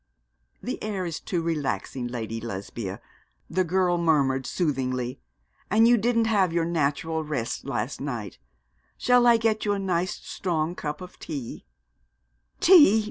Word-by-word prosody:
'This - - -3
air 200 -4 -3
is 165 -2 -4
too 175 -5 -2
relaxing, 145 -5 -2
Lady 115 -2 -4
Lesbia,' 100 -2 -5 0.5
the 185 +2 +1
girl 180 0 +1
murmured, 140 -6 +2
soothingly; 130 -6 -1 0.5
'and 220 +3 +5
you 240 - +6
didn't 230 +1 +2
have 200 -6 +2
your 165 0 +1
natural 160 0 -1
rest 140 -7 -3
last 135 -2 -3
night. 120 -9 -5 0.6
Shall 245 -1 +4
I 235 -1 +7
get 225 -1 0
you 205 - +1
a - - -1
nice 185 -2 -1
strong 165 -2 -2
cup 150 -2 -5
of 180 - -11
tea?' 130 - -7 0.9
'Tea! 300 - +8
165 Hz, 140 wpm, -26 LUFS, 135-195 Hz, 0.9 s, Tea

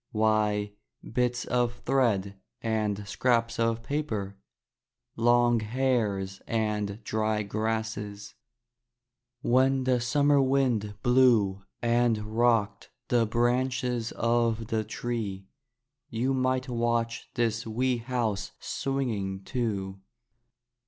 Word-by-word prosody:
Why, 105 -1 +1 0.3
bits 125 +1 0
of 120 -1 0
thread 110 -7 +1 0.2
and 105 -3 -1
scraps 115 +2 +1
of 115 0 +1
paper, 110 -9 -3 0.8
long 120 0 +4
hairs 110 -5 -1
and 105 -1 -1
dry 110 0 0
grasses. 110 -1 -3 1.1
When 130 +2 +3
the 130 -1 +2
summer 145 +3 +3
wind 130 -6 +1
blew 120 -6 +4 0.2
and 120 -1 +3 0.2
rocked 115 -3 +2 0.2
the 120 -2 +3
branches 125 0 0
of 115 -1 +1
the 110 -1 0
tree, 105 -3 -4 0.6
you 125 +4 0
might 130 0 0
watch 115 -1 -1
this 115 -1 0
wee 125 +3 0
house 115 -4 -2
swinging, 110 -9 -2
too. 100 -5 -3
115 Hz, 95 wpm, -28 LUFS, 105-125 Hz, 1.1 s, long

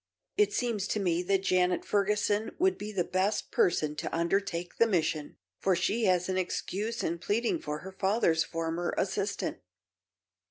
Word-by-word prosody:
It 420 - +3
seems 230 -5 -1
to 215 - -1
me 175 -3 +1
that 195 +1 +1
Janet 180 -1 +2
Ferguson 210 +1 +1
would 375 +2 +3
be 210 +1 -6
the 190 -4 0
best 185 +4 0
person 155 - +2
to - - -3
undertake 175 0 -1
the 230 - +5
mission, 160 -6 -1 0.2
for 190 -1 +2
she 215 +6 +1
has 180 -2 +3
an 185 0 0
excuse 205 +5 -2
in 170 +1 -1
pleading 230 - 0
for 150 0 -4
her 190 - -8
father's 190 -4 +2
former 165 +1 -2
assistant." 195 +1 -1
190 Hz, 160 wpm, -30 LUFS, 175-210 Hz, 0.2 s, the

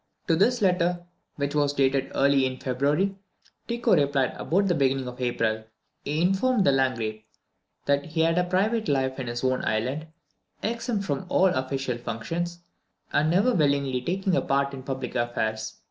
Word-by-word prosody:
To 165 - +4
this 225 +6 +2
letter, 180 -1 +1 0.3
which 140 -1 -2
was 145 -1 +2
dated 135 -1 +1
early 140 -1 +4
in 130 0 -5
February, 145 +10 0 0.5
Tycho 235 -1 +1
replied 140 -2 +1
about 195 +5 +1
the 180 - +3
beginning 135 -3 +1
of 125 +1 -8
April. 110 -3 0 0.4
He 150 +3 -1
informed 195 +4 +2
the - - +5
Landgrave 115 -5 0 0.6
that 140 0 +1
he 160 0 0
led 165 +2 +2
a - - +3
private 205 +5 0
life 135 -2 0
in 130 - -4
his 120 +1 -4
own 130 0 +1
island, 130 +8 -1 0.6
exempt 230 -2 -2
from 145 +1 -3
all 190 - +4
official 130 -4 -2
functions, 170 +10 -4 0.5
and 155 +2 +3
never 200 +9 +3
willingly 140 - +1
taking 185 +6 0
a - - +2
part 140 0 0
in 135 - -6
public 130 -1 -5
affairs. 110 -2 -2
140 Hz, 165 wpm, -26 LUFS, 130-180 Hz, 0.6 s, the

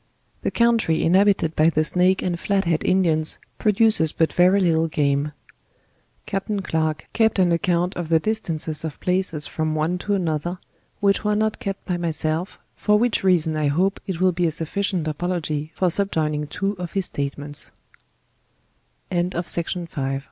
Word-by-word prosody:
The - - 0
country 230 -9 +2
inhabited 190 -2 +3
by 155 +1 +4
the 155 -1 +1
Snake 180 +4 +2
and 175 -2 -2
Flathead 180 -5 0
Indians 165 -4 +2 0.2
produces 210 -7 +3
but 160 - 0
very 180 +3 +4
little 165 -3 +2
game. 145 -1 0 0.9
Captain 195 +1 -3
Clarke 160 -3 -1
kept 220 -2 +2
an 180 -2 +3
account 175 +1 +1
of 175 -3 -4
the 165 -1 +4
distances 160 -7 -1
of 160 -2 -5
places 180 -5 0
from 155 -1 -2
one 160 +4 0
to 205 +2 -1
another; 175 -1 -2 0.4
which 200 0 +2
were 210 0 +1
not 215 0 0
kept 195 -1 -5
by 180 -2 -1
myself, 165 +1 -1 0.2
for 210 0 +2
which 235 +1 +1
raacon 170 -4 +2
I 155 -1 +1
hope 185 +7 +1
it 185 -4 -3
will 185 0 +3
Le 175 -1 +1
a - - +2
sufficient 170 +2 -2
apdogy 155 -1 -2
lor 185 -2 +2
sub 200 +3 +1
joining 150 -2 -1
175 Hz, 140 wpm, -22 LUFS, 155-195 Hz, 0.9 s, by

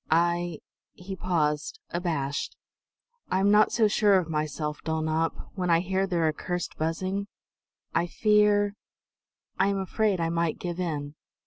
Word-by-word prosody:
I" 170 0 +1 0.3
he 190 +2 -7
paused, 155 -5 -1
abashed 160 -6 -2 0.7
"I 185 - +1
am 200 +1 +4
not 210 +1 +5
so 225 -2 +4
sure 205 -2 +4
of 170 -3 -1
myself, 150 0 -2
Dulnop, 160 0 -1
when 180 -2 -2
I 165 0 +4
hear 190 +1 0
Their 170 -3 +1
accursed 175 +3 -3
buzzing. 185 +5 -2 0.7
I 175 - +1
fear 210 0 +3 0.9
I 190 - +4
am 200 0 +1
afraid 195 0 0
I 165 0 0
might 170 -1 0
give 175 0 -4
in!" 150 -5 -3
175 Hz, 140 wpm, -27 LUFS, 160-195 Hz, 0.9 s, not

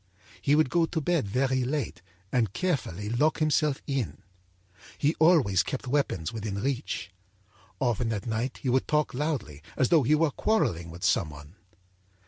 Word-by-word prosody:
âHe 145 - +4
would 155 -4 +3
go 170 0 +3
to 160 - -2
bed 160 -6 0
very 130 +4 +1
late 140 +3 -3 0.3
and 115 -6 +1
carefully 135 - -2
lock 135 +8 +2
himself 155 -2 +1
in. 120 - -3 0.7
He 150 +2 +2
always 150 - +5
kept 135 +5 -4
weapons 125 - -1
within 105 -3 -4
reach. 125 -4 -3 0.7
Often 120 -2 0
at 100 -3 -4
night 115 +3 -2
he 130 - 0
would 130 +1 +2
talk 150 0 +1
loudly, 125 - -3 0.2
as 130 - +2
though 165 -3 +5
he 145 +4 +3
were 155 -1 +2
quarrelling 90 - 0
with 85 +1 -10
some 80 - +2
one. 75 +1 -12
130 Hz, 160 wpm, -28 LUFS, 105-150 Hz, 0.7 s, always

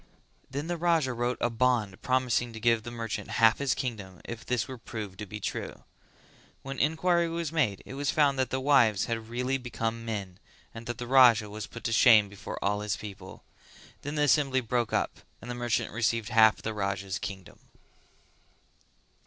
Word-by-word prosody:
Then 140 +3 -4
the 175 +1 -3
Raja 165 -6 +2
wrote 120 +1 -1
a 120 - 0
bond 115 -4 0
promising 125 -2 0
to 110 - -7
give 115 0 +3
the 120 - -7
merchant 115 -2 -5
half 115 0 +5
his 140 -2 +1
kingdom 105 -8 -5
if 120 0 -7
this 125 0 -1
were 130 -2 -8
proved 105 -4 -7
to 105 - -6
be 105 +3 -7
true. - - -5 0.8
When 135 0 -6
enquiry 170 +3 +2
was 165 -2 -3
made 130 -12 0
it - - -9
was 140 0 -2
found 140 -3 +2
that 130 -2 +1
the 130 - -1
wives 130 -7 +4
had 115 -1 -4
really 125 +3 -1
become 115 -2 -3
men, 100 -5 -5 0.3
and 115 0 -9
the 120 0 -4
Raja 120 -5 +5
was 105 0 -6
put 115 - -10
to 115 - -1
shame 110 -4 +6
before 100 -1 -8
all 105 +1 +1
his 105 -2 -2
people. 95 -2 -10 0.6
Then 145 +2 -5
the 150 - +2
assembly 140 -2 +3
broke 120 -1 -1
up - - -1 0.2
and 120 - -7
the - - -3
merchant 120 -1 -1
received 115 -1 0
half 110 0 +5
the 110 - -2
Raja's 100 -2 -3
kingdom. 95 -3 -8
120 Hz, 185 wpm, -28 LUFS, 105-130 Hz, 0.8 s, shame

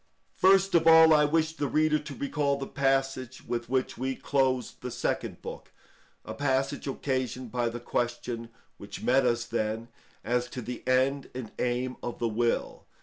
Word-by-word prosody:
First 195 0 +4
of 165 -1 +4
all, 160 -1 +8
I 150 -1 +5
wish 160 +1 +1
the 145 - -1
reader 155 +1 +2
to 145 -1 -8
recall 140 0 0
the 135 - -4
passage 135 -2 -1
with 120 -1 -3
which 130 -1 -1
we 130 +1 -1
closed 130 -3 0
the 125 - -4
Second - - -3
Book,—a - - -11
passage 135 0 -1
occasioned 130 -3 -2
by 120 -1 0
the 120 +1 -6
question, 120 -1 -3 0.3
which 100 0 -9
met 130 +1 +3
us 120 0 0
then, 115 0 -2 0.3
as 120 +2 0
to 125 - -6
the 120 +2 -6
end 130 +2 +2
and 125 -4 -6
aim 125 +1 -1
of 120 - -5
the 120 - 0
will. 115 +2 -1
130 Hz, 165 wpm, -28 LUFS, 120-140 Hz, 0.3 s, all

